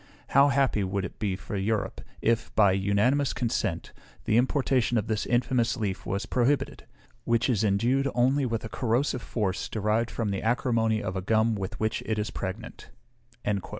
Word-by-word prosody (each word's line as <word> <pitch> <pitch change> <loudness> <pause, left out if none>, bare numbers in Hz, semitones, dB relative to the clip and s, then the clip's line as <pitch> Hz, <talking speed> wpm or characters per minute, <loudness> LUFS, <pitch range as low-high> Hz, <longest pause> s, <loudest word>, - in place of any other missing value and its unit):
How 140 +1 +6
happy 135 -7 +2
would 95 0 -2
it - - -9
be 100 -3 -1
for 95 - -7
Europe, 105 +2 -1 0.2
if, 115 +1 +1
by 100 -3 +5
unanimous 100 +9 +2
consent, 120 -2 -2 0.3
the 110 - +2
importation 125 -1 +2
of 110 - 0
this 110 -1 -2
infamous 120 -1 +1
leaf 100 -4 -3
was 100 +4 -2
prohibited, 130 +4 0 0.4
which 115 0 +1
is 115 -5 +1
endued 120 +7 +2
only 130 +2 +2
with 115 -1 -2
a - - -5
corrosive 125 +2 0
force 100 -6 -2
derived 110 +2 0
from 110 -4 -2
the 100 - -2
acrimony 115 -2 +1
of 95 -2 -3
a 95 - -2
gum 110 +3 +2
with 95 -2 -5
which 110 +1 -1
it 110 - 0
is 105 0 -2
pregnant." 105 +6 -6
115 Hz, 170 wpm, -27 LUFS, 105-125 Hz, 0.4 s, How